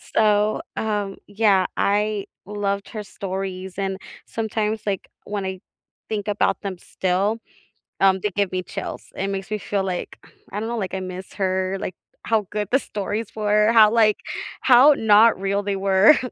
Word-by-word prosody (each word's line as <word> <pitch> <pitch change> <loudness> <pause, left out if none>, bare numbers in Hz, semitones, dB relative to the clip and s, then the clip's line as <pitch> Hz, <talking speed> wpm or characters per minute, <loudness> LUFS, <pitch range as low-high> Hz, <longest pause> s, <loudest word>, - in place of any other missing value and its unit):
So, 210 0 +3 0.2
um, 205 -3 -2
yeah, 205 -2 +3
I 210 0 +1 0.2
loved 200 0 -2
her 215 -2 -6
stories, 190 -2 -5
and 195 -1 -1 0.3
sometimes, 220 -1 -2
like, 200 -2 -2 0.2
when 205 -1 -3
I 190 0 -4 0.5
think 210 -2 -3
about 210 0 +1
them 195 -3 -4
still, 190 +6 -1 0.6
um, 190 -1 +5
they 210 - 0
give 200 -2 +1
me 185 0 -1
chills. - - -6
It 195 - -2
makes 195 0 -4
me 215 - -1
feel 200 -1 -2
like 180 -2 -4 0.3
I 205 - -3
don't 225 - -3
know 235 0 -2
like, 190 -3 -3
I 190 - -2
miss 185 0 -7
her, 190 -1 0
like, 185 - -4 0.3
how 220 -3 +1
good 210 -2 -2
the 270 - +6
stories 210 +1 -4
were, 210 +1 +3
how, 220 -2 +7
like 220 -2 +4 0.4
how 265 +4 +7
not 220 -1 +5
real 200 +1 0
they 200 -1 -1
were. 195 +7 +5
205 Hz, 170 wpm, -23 LUFS, 190-215 Hz, 0.6 s, how